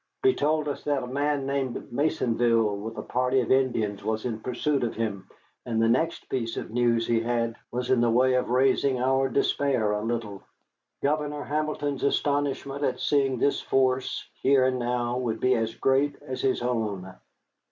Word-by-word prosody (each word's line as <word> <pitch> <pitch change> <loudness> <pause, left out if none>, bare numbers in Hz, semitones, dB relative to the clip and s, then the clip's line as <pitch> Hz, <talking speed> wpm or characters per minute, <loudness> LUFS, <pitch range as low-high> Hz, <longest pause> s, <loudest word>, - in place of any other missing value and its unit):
He 390 0 +5
told 155 - 0
us 145 - -4
that 145 -3 0
a - - -5
man 140 +1 -1
named 135 -3 -1 0.2
Maisonville, 120 -6 +1
with 110 +3 -7
a - - -4
party 125 +1 +1
of 120 - -3
Indians, 115 -7 +1
was 110 +1 -2
in 115 -3 -2
pursuit 130 +4 -1
of 115 - -2
him, 100 -4 -3 0.3
and 115 -2 -2
the 115 - +3
next 145 +8 0
piece 115 -3 -3
of - - -5
news 120 -1 +2
he 115 -1 +2
had 115 0 -1 0.2
was 125 +1 -2
in 125 -2 +4
the 120 - +3
way 130 +3 +3
of 125 -1 +1
raising 130 +1 +2
our 135 +1 +2
despair 130 -4 +1
a 105 0 -1
little. 110 -3 -3 0.6
Governor 150 0 -1
Hamilton's 145 -2 -2
astonishment 140 0 0
at 125 -2 0
seeing 135 -3 +1
this 140 +4 +1
force 130 -1 0
here 135 -1 +4
and 130 -1 +1
now 120 0 -1
would 115 -3 -2
be 130 0 +3
as 115 -1 -1
great 140 +2 +2
as 130 - -5
his 130 -2 0
own. 105 -6 -2
125 Hz, 180 wpm, -26 LUFS, 115-140 Hz, 0.6 s, He